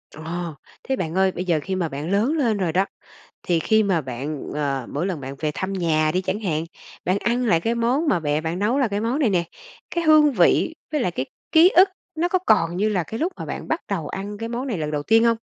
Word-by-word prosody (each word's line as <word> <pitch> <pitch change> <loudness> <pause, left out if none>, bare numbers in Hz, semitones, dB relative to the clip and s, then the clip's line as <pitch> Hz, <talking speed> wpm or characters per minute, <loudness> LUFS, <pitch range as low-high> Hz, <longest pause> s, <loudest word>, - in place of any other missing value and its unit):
Ờ. 165 0 -5 0.3
Thế 265 - -1
bạn 165 -5 -3
ơi, 190 0 +3
bây 180 +1 -5
giờ 165 -4 +2
khi 190 - -2
mà 175 -4 -1
bạn 145 +5 -5
lớn 220 +9 +2
lên 230 -7 +1
rồi 180 -4 0
đó, 190 +2 +3 0.6
thì 170 -2 +1
khi 220 +6 +3
mà 190 -5 +1
bạn, 135 +2 -5
ờ, 140 -4 -2
mỗi 155 +6 -2
lần 175 -7 -3
bạn 135 +1 -6
về 155 - -1
thăm 190 +1 -3
nhà 155 -4 +1
đi 185 - +2
chẳng 205 +3 -2
hạn, 160 -5 -1 0.4
bạn 185 +3 +1
ăn 240 +2 0
lại 165 -6 +3
cái 230 +6 0
món 250 +7 +1
mà 175 - +2
mẹ 150 0 0
bạn 165 +2 -3
nấu 230 +7 +1
là 255 -5 +2
cái 205 0 -2
món 235 +6 0
này 250 -9 +2
nè, 175 -2 +1 0.5
cái 340 -1 -1
hương 305 -2 +6
vị 220 - +3 0.2
với 300 - +1
lại 180 - +1
cái 135 -5 -3 0.3
ký 325 +3 +8
ức 380 +2 +8 0.3
nó 335 +2 0
có 370 +1 +2
còn 175 -5 +3
như 210 +3 +1
là 190 -5 0
cái 220 +8 -6
lúc 350 +5 -1
mà - - -6
bạn - - -6
bắt 320 - 0
đầu 170 -7 -2
ăn 205 +2 -5
cái 230 0 -4
món 245 +3 -3
này 225 -8 -2
lần 150 -1 -2
đầu 145 -1 -2
tiên 225 +6 +4
hông? 230 -1 +4
190 Hz, 265 wpm, -23 LUFS, 160-235 Hz, 0.6 s, ký